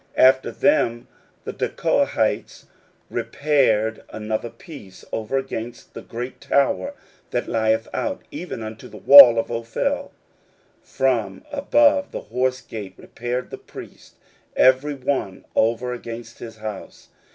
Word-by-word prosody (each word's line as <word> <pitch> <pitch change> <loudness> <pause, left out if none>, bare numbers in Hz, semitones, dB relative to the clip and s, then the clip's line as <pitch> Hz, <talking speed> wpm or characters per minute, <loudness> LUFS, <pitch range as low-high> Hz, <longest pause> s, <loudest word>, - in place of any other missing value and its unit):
16:003:027 130 - +8
After 130 0 -8
them 120 -9 +1 0.4
the - - -6
Tekoites - - -1 0.5
repaired 110 -7 +1
another 110 +2 -4
piece, 110 - -13
over 110 +4 -2
against 120 -3 -6
the - - -8
great 120 +2 -7
tower 140 - +1 0.3
that 120 - -2
lieth 110 0 +1
out, 285 -1 -3
even 180 - -6
unto 110 0 -8
the - - -12
wall 135 -4 +10
of 115 - -1
Ophel. 115 -1 -2 0.7
16:003:028 - - -33
From 130 - 0
above 290 0 +3
the - - -5
horse 130 0 -1
gate 105 -5 -8
repaired 120 +2 -5
the - - -7
priests, - - -13 0.4
every 130 +3 +4
one 130 -8 -3
over 120 +2 +1
against 120 -1 -8
his 115 -2 -9
house. 110 -2 -8
120 Hz, 130 wpm, -22 LUFS, 110-135 Hz, 0.7 s, wall